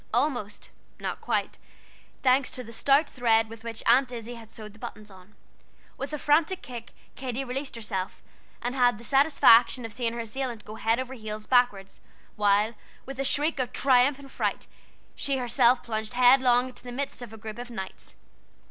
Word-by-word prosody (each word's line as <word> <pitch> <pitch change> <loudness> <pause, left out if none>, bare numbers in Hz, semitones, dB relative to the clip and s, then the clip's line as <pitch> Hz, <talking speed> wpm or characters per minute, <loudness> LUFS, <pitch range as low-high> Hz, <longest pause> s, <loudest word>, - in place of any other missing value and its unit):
Almost, 245 -8 -1 0.3
not - - -4
quite, - - -1 0.6
thanks 260 0 +4
to 255 - -7
the 230 - -11
stout 275 +6 +3
thread 225 -3 +2
with 225 0 -11
which 230 -1 -6
Aunt 255 +2 +4
Izzie 235 0 -6
had 230 -2 -12
sewed 220 - -10
on 210 - -10
the 220 - -19
buttons. 215 -1 -9 0.8
With 275 +2 -5
a 300 - -2
frantic 310 +6 +2
kick 240 -2 -9 0.2
Katy 260 0 -4
released 265 +2 -4
herself, 210 -5 -4 0.4
and 245 +1 -1
had 245 -4 +3
the 235 - -13
satisfaction 260 -3 +5
of 225 - -7
seeing 235 -1 -1
her 235 - -5
assailant 235 0 -4
go 215 - -8
head 225 +2 0
over 260 0 -4
heels 215 -3 -6
backward, 245 -6 +2 0.5
while, 210 +2 +3 0.3
with 270 0 -8
a - - +1
shriek 295 +2 +1
of 250 -1 -1
triumph 265 +1 +4
and 275 -1 -13
fright, - - -2 0.5
she 275 -1 -1
herself 245 0 +3
plunged 220 0 -4
headlong 250 0 +5
into 255 - -13
the 245 - -8
midst 270 +1 -4
of 240 -3 -8
a 220 - -10
group 215 +1 -8
of 245 0 -7
Knights. 190 -5 -8
245 Hz, 185 wpm, -27 LUFS, 225-265 Hz, 0.8 s, satisfaction